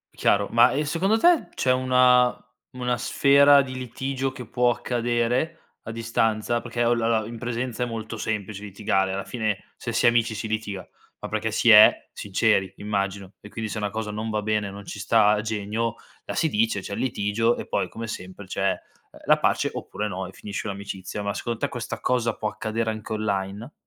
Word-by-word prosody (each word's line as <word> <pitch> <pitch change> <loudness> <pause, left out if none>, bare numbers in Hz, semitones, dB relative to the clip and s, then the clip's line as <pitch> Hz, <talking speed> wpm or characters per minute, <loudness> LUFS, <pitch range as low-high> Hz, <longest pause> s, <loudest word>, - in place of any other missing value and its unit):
Chiaro. 100 0 +2
Ma, 120 +2 +6
e 150 +2 0
secondo 185 +8 +1
te 345 +6 +4
c'è 130 - +2
una 125 -1 +4 0.4
una 125 -1 -1
sfera 140 +2 +5
di 130 -1 -6
litigio 130 +2 -3
che 125 -3 -9
può 125 +1 +2
accadere 120 +5 -1 0.2
a - - -6
distanza? 115 0 0
Perché, 120 0 -2
olla 115 -1 +2
la 115 -1 +3
la - - -7
in 115 0 -7
presenza 120 +1 -3
è - - 0
molto 115 -1 -5
semplice 105 -2 -4
litigare, 95 -1 0
alla 95 0 -3
fine 110 -1 -3
se - - -5
si - - +1
è - - +8
amici 120 -1 +1
si 110 +1 -4
litiga, 110 -3 -4 0.3
ma - - -6
perché - - -1
si - - +2
è - - +7
sinceri 100 -1 +1
immagino, 100 -2 -3
e 105 - -11
quindi 110 0 -5
se - - -4
una 105 - -1
cosa 110 0 -4
non 110 +1 -4
va 105 0 -1
bene, 105 -1 0
non 100 +1 -10
ci 105 - -7
sta 105 0 +4
a 105 0 +2
genio, 110 +2 -2 0.3
la - - -4
si 165 - +2
dice, 110 -3 +1
c'è 100 - -7
il - - -4
litigio 115 -1 +1
e - - -6
poi - - -1
come 115 0 -6
sempre 95 -1 -7
c'è, 100 +1 0
ehm, - - -9
la - - +5
pace - - +1
oppure 105 - -4
no 95 -1 -4
e 95 - -10
finisce 105 +2 -6
un'amicizia. 100 0 -5
Ma 100 - -1
secondo 120 +2 -3
te - - -1
questa 120 -1 -5
cosa 120 -3 0
può 110 - -1
accadere 110 +1 -2
anche 110 0 -6
online? 105 +3 -3
110 Hz, 205 wpm, -25 LUFS, 105-120 Hz, 0.4 s, è